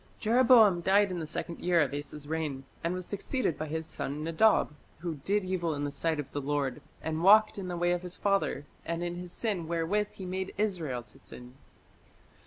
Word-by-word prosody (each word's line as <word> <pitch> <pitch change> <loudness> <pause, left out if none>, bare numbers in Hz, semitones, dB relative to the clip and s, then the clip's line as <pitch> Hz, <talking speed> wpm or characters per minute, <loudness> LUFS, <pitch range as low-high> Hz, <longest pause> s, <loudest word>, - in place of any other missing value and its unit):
" - - -32
Jeroboam 225 -5 +6
died 195 +2 +4
in 180 - -3
the 160 - -4
second 170 +2 -5
year 175 -1 +2
of 145 -3 +2
Asa's 145 0 -6
reign, 150 -4 -3 0.2
and 170 +2 0
was 185 -1 -5
succeeded 205 - -1
by 155 +3 -4
his 160 +1 -3
son 150 -1 -4
Nadab, 165 +2 +3 0.3
who 165 -4 -4
"did 205 0 +1
evil 175 -4 -1
in 145 - -3
the 145 - -2
sight 160 +1 -1
of 145 - -5
the 145 - -3
Lord, 140 -2 -1 0.2
and 160 0 -2
walked 215 +3 +6
in 190 - -5
the 175 -1 -3
way 175 +1 +2
of 175 -1 0
his 180 -1 -5
father, 195 -7 0 0.2
and 170 +1 -3
in 175 0 -2
his 180 0 -7
sin 195 -8 -2
wherewith 170 +5 0
he 190 - -8
made 185 +1 -4
Israel 170 - -1
to - - -17
sin". 125 0 -12
170 Hz, 210 wpm, -30 LUFS, 155-195 Hz, 0.3 s, Jeroboam